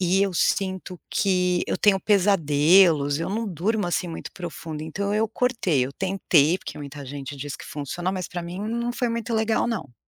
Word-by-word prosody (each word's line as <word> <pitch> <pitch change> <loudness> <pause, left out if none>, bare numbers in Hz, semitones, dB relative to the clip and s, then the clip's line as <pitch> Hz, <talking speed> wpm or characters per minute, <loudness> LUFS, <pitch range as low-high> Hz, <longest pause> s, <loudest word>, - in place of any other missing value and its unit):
E 185 +1 +2
eu 195 -2 0
sinto 185 0 -1
que 180 -2 +1
eu - - -1
tenho 200 -2 +4
pesadelos, 165 -6 +4
eu 165 - -2
não 225 +2 -2
durmo, 200 +3 -1
assim, 175 0 -1
muito 165 - -7
profundo, 165 -3 -6
então 200 +6 -2
eu 220 +1 +2
cortei, 210 - +1
eu 140 - -8
tentei, 185 -3 +2
porque - - -8
muita 145 -1 -8
gente 140 +1 -7
diz 145 +1 -5
que - - -9
funciona, 165 +5 -4
mas 185 -2 -3
pra 175 -1 -5
mim 175 +3 -6
não 235 +3 -2
foi 245 -1 -1
muito 230 0 -3
legal 220 0 +1
não. 210 - -4
180 Hz, 190 wpm, -24 LUFS, 155-205 Hz, -, tenho